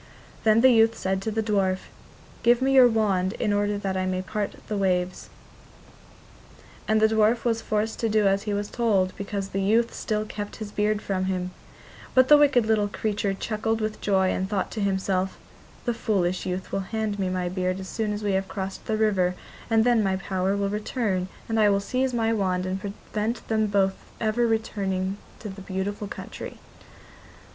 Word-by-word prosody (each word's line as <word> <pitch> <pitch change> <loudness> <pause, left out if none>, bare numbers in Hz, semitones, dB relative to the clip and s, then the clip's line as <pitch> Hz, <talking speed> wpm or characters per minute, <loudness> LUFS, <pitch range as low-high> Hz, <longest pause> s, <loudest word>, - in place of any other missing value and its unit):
Then 220 +1 +5
the 260 +1 +7
youth 225 -1 +4
said 190 0 -1
to 220 - -2
the 220 +1 -1
dwarf: 195 -3 +1 0.6
'Give 240 0 +4
me 270 +1 +2
your 260 -2 +8
wand 200 -5 +1
in 210 - 0
order 205 0 +1
that 195 -1 -2
I 185 0 0
may 185 0 -1
part 205 +3 -3
the 215 - -2
waves.' 185 -2 0 1.6
And 220 0 +3
the 220 - +5
dwarf 220 +1 +3
was 230 -1 +1
forced 215 +1 -1
to 225 - 0
do 215 -1 +3
as 195 0 +2
he 210 0 -3
was 205 0 -3
told 200 -6 +1
because 200 -1 -4
the 195 - -2
youth 225 +4 +2
still 215 -1 -2
kept 205 -1 -6
his 215 -2 -7
beard 210 0 0
from 185 -1 -1
him; 185 -1 -2 0.6
but 255 0 +5
the 295 - +9
wicked 275 -6 +4
little 215 -2 +2
creature 205 -1 -1
chuckled 225 +2 -1
with 215 -1 -3
joy 190 -2 +2
and 190 +1 -2
thought 205 -2 -1
to 215 - -4
himself: 190 -1 0 0.5
'The 240 - +1
foolish 185 -6 0
youth 185 0 -4
will - - 0
hand 220 -2 -2
me 190 -1 0
my 185 -1 -1
beard 185 +1 -1
as 190 - -7
soon 215 +1 -2
as 210 0 -4
we 205 - +1
have 190 0 0
crossed 190 -1 -5
the 220 - 0
river, 190 -5 +2 0.3
and 225 -1 +4
then 240 -1 +4
my 195 -2 +1
power 190 0 -1
will 200 0 0
return, 210 -3 -1 0.2
and 225 -1 0
I 210 -1 +5
will 200 0 +3
seize 255 +6 -1
my 225 -2 +1
wand 185 -4 0
and 190 +1 -3
prevent 210 +2 -4
them 220 -1 +2
both 195 -1 +2 0.2
ever 230 +2 +1
returning 195 -4 -1 0.2
to 215 - -6
their 195 0 -9
beautiful 200 +2 -3
country. - - -8
205 Hz, 195 wpm, -25 LUFS, 190-220 Hz, 1.6 s, the